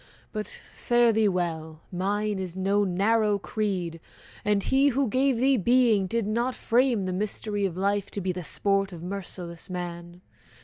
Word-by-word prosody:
But 215 Hz, -1 st, -4 dB
fare 240 Hz, -1 st, +1 dB
thee 220 Hz, -1 st, +3 dB
well! 160 Hz, -4 st, -2 dB
Mine 205 Hz, +3 st, -1 dB
is 185 Hz, -2 st, -5 dB
no 195 Hz, +2 st, +2 dB
narrow 205 Hz, +3 st, +2 dB
creed; 190 Hz, -6 st, -3 dB, 0.4 s
And 205 Hz, -1 st, +2 dB
He 270 Hz, +2 st, +3 dB
who 275 Hz, 0 st, +2 dB
gave 260 Hz, +3 st, +2 dB
thee 265 Hz, +2 st, +3 dB
being 230 Hz, -2 st, +3 dB
did 230 Hz, +2 st, -1 dB
not 235 Hz, +4 st, 0 dB
frame 235 Hz, -4 st, +2 dB
The 185 Hz, -, -2 dB
mystery 205 Hz, +1 st, -1 dB
of 180 Hz, -2 st, -7 dB
life 200 Hz, +1 st, 0 dB
to -, -, 0 dB
be 185 Hz, 0 st, 0 dB
the 180 Hz, 0 st, -5 dB
sport 195 Hz, +3 st, 0 dB
Of 170 Hz, -1 st, -8 dB
merciless 180 Hz, -2 st, -6 dB
man! 175 Hz, -1 st, -6 dB
200 Hz, 165 wpm, -27 LUFS, 180-225 Hz, 0.4 s, thee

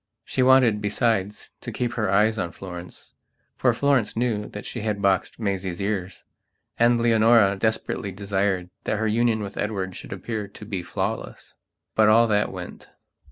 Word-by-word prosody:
She 130 Hz, -, -1 dB
wanted, 125 Hz, -5 st, +5 dB
besides, 105 Hz, -1 st, -1 dB
to -, -, -6 dB
keep 120 Hz, -1 st, -2 dB
her 110 Hz, -4 st, -1 dB
eyes 105 Hz, +3 st, +3 dB
on 85 Hz, -, -2 dB
Florencefor 90 Hz, -1 st, -5 dB
Florence 140 Hz, -6 st, +1 dB
knew 115 Hz, -3 st, 0 dB
that 105 Hz, -, -8 dB
she 115 Hz, -, -5 dB
had 105 Hz, -2 st, -2 dB
boxed 100 Hz, -2 st, +1 dB
Maisie's 95 Hz, -4 st, -2 dB
ears. 95 Hz, -2 st, -3 dB, 0.6 s
And 120 Hz, 0 st, +4 dB
Leonora 115 Hz, -3 st, +4 dB
desperately 100 Hz, -1 st, -1 dB
desired 95 Hz, -2 st, -1 dB
that 110 Hz, -, 0 dB
her 110 Hz, -, -1 dB
union 115 Hz, 0 st, +2 dB
with 100 Hz, -1 st, -7 dB
Edward 95 Hz, -3 st, -2 dB
should -, -, -10 dB
appear 110 Hz, -3 st, -4 dB
to 105 Hz, +1 st, -12 dB
be 100 Hz, -4 st, -3 dB
flawless. 85 Hz, -, -4 dB, 0.4 s
But 110 Hz, -1 st, +4 dB
all 115 Hz, +2 st, +6 dB
that 105 Hz, -1 st, +1 dB
went.... -, -, -9 dB
105 Hz, 160 wpm, -24 LUFS, 100-115 Hz, 0.6 s, all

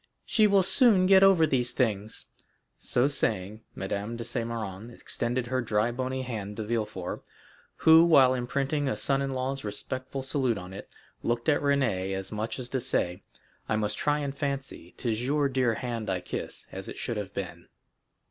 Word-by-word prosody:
"She 215 Hz, -2 st, +4 dB
will 200 Hz, -2 st, +4 dB
soon 190 Hz, 0 st, +5 dB
get 190 Hz, 0 st, +6 dB
over 195 Hz, -4 st, +6 dB
these 125 Hz, -5 st, 0 dB
things." 110 Hz, -4 st, -1 dB, 0.5 s
So 125 Hz, +3 st, +2 dB
saying, 110 Hz, -6 st, 0 dB
Madame 100 Hz, +4 st, -3 dB
de 115 Hz, -, -5 dB
Saint 120 Hz, 0 st, -3 dB
Méran 110 Hz, -1 st, -5 dB
extended 120 Hz, +1 st, -3 dB
her 130 Hz, +2 st, -1 dB
dry 110 Hz, 0 st, +1 dB
bony 130 Hz, +1 st, -3 dB
hand 105 Hz, -4 st, -5 dB
to 110 Hz, -, -3 dB
Villefort, 105 Hz, -5 st, -3 dB, 0.5 s
who, 160 Hz, +1 st, +7 dB
while 140 Hz, -6 st, +6 dB
imprinting 140 Hz, +3 st, -1 dB
a -, -, -1 dB
son 135 Hz, -1 st, +1 dB
in 135 Hz, -, -1 dB
law's 135 Hz, +1 st, -3 dB
respectful 130 Hz, +5 st, -4 dB
salute 130 Hz, -4 st, 0 dB
on 90 Hz, 0 st, -8 dB
it, 100 Hz, -, -9 dB, 0.3 s
looked 120 Hz, 0 st, -1 dB
at 150 Hz, -2 st, +3 dB
Renée, 130 Hz, -10 st, +1 dB
as 95 Hz, 0 st, -5 dB
much 110 Hz, +1 st, -3 dB
as 125 Hz, -2 st, -6 dB
to 130 Hz, 0 st, -2 dB
say, 90 Hz, -6 st, 0 dB, 0.5 s
"I 110 Hz, -, +2 dB
must 105 Hz, -1 st, 0 dB
try 145 Hz, +5 st, +1 dB
and 140 Hz, -2 st, -3 dB
fancy 140 Hz, -1 st, -5 dB
'tis 115 Hz, -2 st, -2 dB
your 145 Hz, +2 st, +1 dB
dear 130 Hz, -4 st, +1 dB
hand 115 Hz, -2 st, -4 dB
I 95 Hz, -1 st, 0 dB
kiss, 90 Hz, -, -6 dB
as -, -, -7 dB
it -, -, -7 dB
should -, -, -3 dB
have -, -, -6 dB
been." -, -, -6 dB
125 Hz, 180 wpm, -28 LUFS, 110-140 Hz, 0.5 s, who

